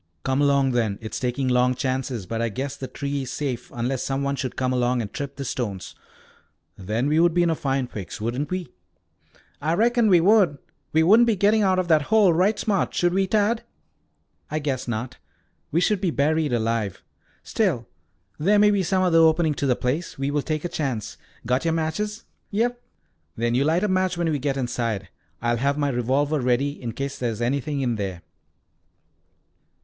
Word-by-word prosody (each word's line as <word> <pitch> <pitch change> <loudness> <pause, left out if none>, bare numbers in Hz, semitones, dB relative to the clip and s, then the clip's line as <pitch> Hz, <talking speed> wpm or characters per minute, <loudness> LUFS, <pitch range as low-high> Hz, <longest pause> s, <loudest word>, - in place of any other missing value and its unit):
"Come 135 +1 +1
along 140 -2 +3
then. 115 -5 0
It 110 -1 -8
is - - -2
taking 130 +1 -1
long 125 0 +3
chances, 130 -5 -2
but 115 +4 -3
I 115 - 0
guess 135 +6 -4
the 130 - -6
tree 140 +1 -3
is 130 -2 -5
safe 130 -5 -4
unless 120 +2 -2
some 135 0 -2
one 140 0 0
should 130 -2 -4
come 130 0 0
along 125 0 +1
and 105 -4 -5
trip 140 -1 -5
the 140 - -5
stones. 105 -7 -4 0.8
Then 105 +6 -2
we 155 +2 +2
would 170 0 +3
be 175 - +4
in 170 - +2
a - - 0
fine 135 -3 -1
fix, 100 -8 -7
shouldn't 120 +6 -3
we?" 185 -5 -3 0.9
"I 155 +3 0
reckon 235 +2 +3
we 180 -4 +6
would. 185 -4 +4 0.3
We 160 +1 +3
wouldn't 220 +8 +6
be 225 - +3
getting 205 +3 +3
out 190 -2 +3
of 185 -1 0
that 155 -2 +5
hole, 210 -5 +5
right 190 +6 +2
smart, 200 -3 0
should 175 0 +2
we, 195 0 +1
Tad?" 215 +3 +1 0.9
"I 155 - -2
guess 140 -5 -2
not. 120 +2 -4 0.5
We 165 - +2
should 195 +1 +1
be 185 - +1
buried 155 0 +1
alive." 115 -4 -1 0.4
"Still, 170 - 0 0.5
there 200 +7 +3
may 210 0 +5
be 200 -1 +2
some 185 +1 +1
other 170 -3 +4
opening 160 -1 +4
to 140 - -2
the 125 - +3
place. 140 +9 -2
We 135 +1 -1
will 145 0 0
take 155 +2 -3
a - - +1
chance. 135 - -3 0.3
Got 125 +3 +1
your 165 -1 +1
matches?" 210 +8 -2 0.2
"Yes." 230 +4 +1 0.6
"Then 120 +1 0
you 130 +3 +2
light 165 +5 +2
a - - +2
match 185 -2 +1
when 170 -2 0
we 145 - -1
get 135 0 -1
inside. 115 -6 -2 0.3
I'll 120 0 +1
have 140 +4 0
my 145 -1 +1
revolver 135 +4 0
ready 130 +3 0
in 120 -2 -4
case 140 +2 -4
there 120 - 0
is 110 - -5
anything 140 +4 -1
in 120 -4 0
there." 95 -4 -4
140 Hz, 200 wpm, -24 LUFS, 125-175 Hz, 0.9 s, we